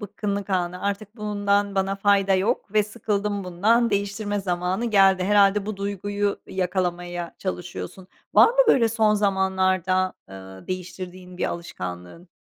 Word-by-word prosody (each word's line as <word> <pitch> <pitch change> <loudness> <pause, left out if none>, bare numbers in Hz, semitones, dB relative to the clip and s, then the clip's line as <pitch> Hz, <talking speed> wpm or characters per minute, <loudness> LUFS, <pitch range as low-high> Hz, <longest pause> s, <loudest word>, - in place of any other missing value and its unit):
bıkkınlık 200 0 -4
anı. 180 -1 -1
"Artık 200 +2 -3
bundan 205 -1 0
bana 195 0 0
fayda 195 -1 +3
yok 200 +2 -1
ve 215 -1 +4
sıkıldım 205 -2 -2
bundan 220 +7 +2
değiştirme 205 0 -1
zamanı 180 +3 -1
geldi." 195 -4 +4
Herhâlde 200 0 +4
bu 215 -2 -4
duyguyu 200 +1 -2
yakalamaya 175 -2 -3
çalışıyorsun. 180 0 -6 0.3
Var - - +8
mı - - -5
böyle 235 - +5
son 220 -1 +2
zamanlarda, 190 -2 +1 0.2
ııı, 95 0 -11
değiştirdiğin 180 0 -7
bir - - 0
alışkanlığın? 90 - -6
195 Hz, 130 wpm, -24 LUFS, 180-205 Hz, 0.3 s, Var